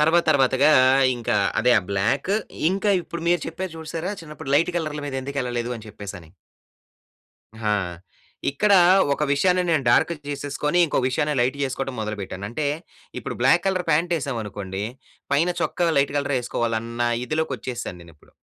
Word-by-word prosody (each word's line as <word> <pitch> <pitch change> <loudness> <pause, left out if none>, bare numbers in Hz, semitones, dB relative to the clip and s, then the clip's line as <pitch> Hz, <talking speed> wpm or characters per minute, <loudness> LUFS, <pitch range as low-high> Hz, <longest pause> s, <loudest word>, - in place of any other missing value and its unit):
తర్వాత 160 +3 +4
తర్వాతగా 135 +1 +4 0.5
ఇంకా 115 -3 -1 0.2
అదే 125 +2 +3
ఆ - - 0
బ్లాక్ 105 - 0 0.4
ఇంకా 195 +2 +1
ఇప్పుడు 170 -1 -7
మీరు 175 0 +3
చెప్పారు 180 +2 -5
చూసారా! 165 +4 -4
చిన్నప్పుడు 150 -4 -7
లైట్ 165 +4 +3
కలర్ల 155 -2 -4
మీద 140 - -5
ఎందుకెళ్ళలేదు 125 -3 -3
అని 110 -1 -11
చెప్పేసని. 100 -6 -9 1.3
హా! 105 -1 +1 0.8
ఇక్కడ 200 +9 +2 0.4
ఒక 150 - -2
విషయాన్ని 180 +5 +3
నేను 155 -5 +2
డా‌ర్క్‌కి 160 +7 +3
జేసేసుకొని, 145 +3 -1
ఇంకో 155 - -1
విషయాన్న 150 +3 0
లైట్ 130 +3 0
ఏసుకోవడం 135 0 -4
మొదలుపెట్టాను. 100 -3 -5
అంటే 145 +4 -2 0.5
ఇప్పుడు - - -5
బ్లాక్ - - +4
కలర్ 185 -2 0
పాంటేసామనుకోండి, 120 - -1 0.5
పైన 165 +5 +3
చొక్క 175 -1 +1
లైట్ 140 0 +2
కలరే 140 -2 0
వేసుకోవాలన్న 120 0 -1
ఇదిలోకొచ్చేసాను 130 - -3
నేనిప్పుడు. 85 -3 -18
140 Hz, 135 wpm, -23 LUFS, 115-160 Hz, 1.3 s, తర్వాత